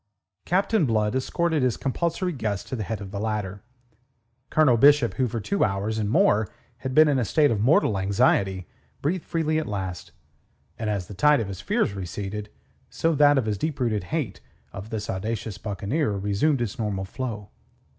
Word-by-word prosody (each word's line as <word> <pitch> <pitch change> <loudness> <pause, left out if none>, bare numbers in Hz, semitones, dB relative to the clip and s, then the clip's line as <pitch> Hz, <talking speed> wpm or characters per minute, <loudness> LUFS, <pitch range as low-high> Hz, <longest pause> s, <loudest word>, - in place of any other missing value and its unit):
Captain 190 -1 +2
Blood 110 -2 +1
escorted 160 +4 0
his 125 -3 +1
compulsory 170 +6 -1
guest 105 -8 -3
to - - -4
the 115 - -4
head 105 0 -4
of 95 -1 -7
the 100 - -4
ladder. 105 -2 -3 0.9
Colonel 150 -6 +4
Bishop, 140 0 +5
who 130 -2 0
for 115 0 -3
two 195 - 0
hours 100 +3 -1
and 105 -1 -1
more 110 -1 +3 0.3
had 130 +1 -5
been 155 0 +7
in 140 -3 +2
a - - +1
state 145 +6 +3
of 105 -3 0
mortal 110 -5 +3
anxiety, 95 -1 +1 0.4
breathed 170 +4 0
freely 155 -1 0
at 155 - -4
last; 95 -4 -5 0.7
and 110 -2 -2
as 100 -4 -1
the 100 - -10
tide 150 +7 +4
of 105 -4 -3
his 95 -1 -6
fears 100 - 0
receded, 100 +2 -5 0.4
so 165 0 0
that 145 -1 +5
of 130 - +1
his 105 -3 -2
deep 155 +2 -2
rooted 110 -6 0
hate 145 - -3 0.3
of 100 +3 -8
this 110 -2 -4
audacious 105 +1 -4
buccaneer 105 - -1
resumed 105 +8 +1
its 115 -2 -3
normal 100 -3 -2
flow. 105 -1 -5
110 Hz, 185 wpm, -25 LUFS, 100-145 Hz, 0.9 s, been